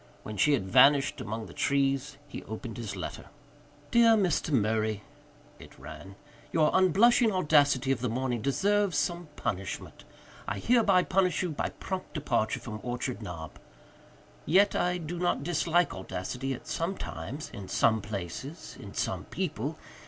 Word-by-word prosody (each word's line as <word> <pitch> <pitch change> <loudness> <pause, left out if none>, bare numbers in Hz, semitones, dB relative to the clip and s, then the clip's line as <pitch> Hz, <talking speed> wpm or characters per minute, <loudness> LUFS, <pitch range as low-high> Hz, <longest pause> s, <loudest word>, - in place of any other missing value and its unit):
When 110 - -6
she 145 +9 +3
had 115 -9 0
vanished 135 +4 +5
among 110 -1 -4
the - - -11
trees 135 0 0
he - - -7
opened 110 0 -7
his 110 -4 -5
letter. 90 - -6 0.7
"Dear 230 -1 +6
Mr. 180 -6 +1
Murray," 110 -3 +1 0.6
it - - -14
ran, 80 +5 -10 0.4
"your 155 -2 +3
unblushing 215 +6 +5
audacity 145 -7 +3
of 135 - 0
the 125 - 0
morning 125 0 -1
deserves 195 - +1
some 175 -1 -1
punishment. 95 0 -4 0.4
I - - -2
hereby 215 -6 +4
punish 185 -2 +1
you 180 - -2
by 150 - -2
prompt 190 -2 -6
departure 120 -7 0
from 110 -2 -7
Orchard 125 0 -3
Knob. 85 -6 -8 0.8
Yet 195 +6 +4
I 180 0 +1
do 170 0 -5
not 175 -5 0
dislike 175 +1 +1
audacity, 95 +8 -4
at - - -12
some 170 +4 -2
times, 135 - -6
in 100 -2 -8
some 110 +2 +2
places, 105 - -6
in - - -10
some - - -2
people. - - -3
140 Hz, 150 wpm, -29 LUFS, 110-175 Hz, 0.8 s, Dear